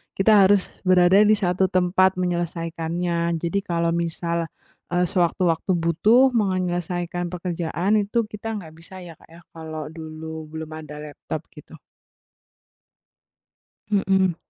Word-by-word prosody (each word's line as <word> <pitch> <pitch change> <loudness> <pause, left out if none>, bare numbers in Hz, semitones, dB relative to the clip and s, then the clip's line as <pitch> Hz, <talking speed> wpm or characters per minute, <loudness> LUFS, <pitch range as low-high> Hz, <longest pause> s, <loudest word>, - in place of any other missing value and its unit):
kita 195 +3 +3 0.2
harus 200 0 +4 0.3
berada 185 +1 +6
di 215 - +5
1 190 -1 +1
tempat 185 +1 +2
menyelesaikannya. 170 -1 -2
Jadi 175 +4 0
kalau 170 -1 +1
misal, 170 0 -2 0.5
eee, 180 0 +3
sewaktu-waktu 175 -1 +1
butuh 210 +11 +4
mau 220 -4 +2
ngenyelesaikan 175 -1 -2
pekerjaan 175 +3 -1
itu, 205 +3 -2
kita 210 +1 -7
nggak 165 -6 -10
bisa 185 +2 -11
ya, 170 - -10
Kak, - - -21
ya, 170 - -14
kalau 155 -2 -7
dulu 160 0 -8
belum 160 0 -7
ada 150 -1 -10
laptop, 150 -2 -6
gitu. - - -14 2.2
Mhm. 190 -3 +2
175 Hz, 125 wpm, -23 LUFS, 165-185 Hz, 2.2 s, berada